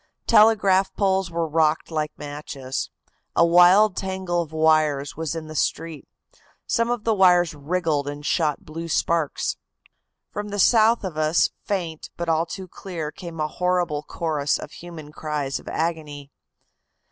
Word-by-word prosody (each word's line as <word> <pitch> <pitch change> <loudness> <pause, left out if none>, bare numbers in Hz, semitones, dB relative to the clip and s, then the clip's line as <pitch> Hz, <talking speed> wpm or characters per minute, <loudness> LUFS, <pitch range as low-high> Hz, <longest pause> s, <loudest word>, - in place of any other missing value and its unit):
Telegraph 200 -3 +4
poles 190 -2 +1
were 165 -1 -2
rocked 155 +1 +1
like 155 -1 -1
matches. 145 -3 -5 0.5
A 170 - +5
wild 180 +4 +6
tangle 190 -2 -2
of 160 -2 -7
wires 155 -3 +2
was 160 0 -3
in 160 -1 -5
the 155 - -9
street. 160 0 -2 0.6
Some 230 -1 0
of 240 -3 -1
the 225 - +2
wires 180 -4 +4
wriggled 150 -1 -1
and 145 0 -6
shot 150 -4 0
blue 165 +2 -6
sparks. 165 -1 0 0.7
"From 210 0 -4
the 205 0 -5
south 225 +3 +4
of 180 -5 -5
us, 155 +2 +2
faint, 170 -6 -3
but 170 - -3
all 165 +1 +1
too 190 +2 -7
clear, 165 -4 -6
came 170 0 -9
a 155 - 0
horrible 175 -2 0
chorus 150 -2 -1
of 150 - -9
human 165 -4 -10
cries 150 -3 -3
of - - -17
agony. 150 -4 -3
165 Hz, 150 wpm, -23 LUFS, 150-185 Hz, 0.7 s, wild